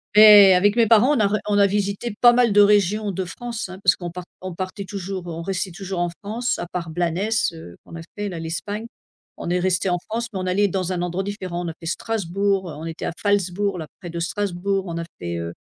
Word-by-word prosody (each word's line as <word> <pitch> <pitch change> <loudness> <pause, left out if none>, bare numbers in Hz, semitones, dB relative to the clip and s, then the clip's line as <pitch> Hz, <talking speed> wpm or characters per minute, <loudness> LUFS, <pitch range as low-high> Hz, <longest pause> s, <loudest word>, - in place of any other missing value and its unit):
Mais 210 -2 +9
avec 205 +4 +3
mes 230 -2 +5
parents, 235 +6 +5
on - - 0
a 210 - +4
re 210 +1 0
on 205 -1 +1
a 200 - +5
visitées 205 +3 -2
pas 240 - +8
mal 240 -3 +3
de 205 - +7
régions 205 0 +3
de 190 0 -3
France, 235 +4 -5
hein. 185 +1 -10
Parce - - +5
qu'on 175 -2 -6
part 180 +1 -7 0.2
on 185 -1 -6
partait 190 +2 -5
toujours, 190 -2 -6
heu, - - -5
on 165 - -5
restait 190 +1 -2
toujours 190 0 -5
en 175 0 0
France. 220 +7 -3
À - - -5
part 170 -1 -5
Blanes, 170 0 -1 0.4
heu, 160 - -11
qu'on - - -12
a - - -7 0.2
fait 205 0 -3
là, 175 -3 -6
l'Espagne. 200 +7 -4 0.5
On - - -5
est 180 +1 +1
restés 185 +1 +1
en 175 - +1
France, 230 +2 -2
mais 195 - -4
on 185 - -3
allait 200 +2 +2
dans 185 0 -2
un 175 - -2
endroit 180 +2 -2
différent. 185 -3 -4
On - - -3
a - - -5
fait - - -9
Strasbourg, 195 -1 -1
heu, - - -8
on 155 +2 -8
était 165 0 -5
à - - -1
Falzbourg, 200 -1 0
là 160 -3 -6
près 175 - -8
de 170 0 -5
Strasbourg, 195 +1 -1
on 170 -1 -4
a 170 - -3 0.2
fait, 85 -1 -4
heu 85 0 -5
190 Hz, 255 wpm, -22 LUFS, 175-205 Hz, 0.5 s, Mais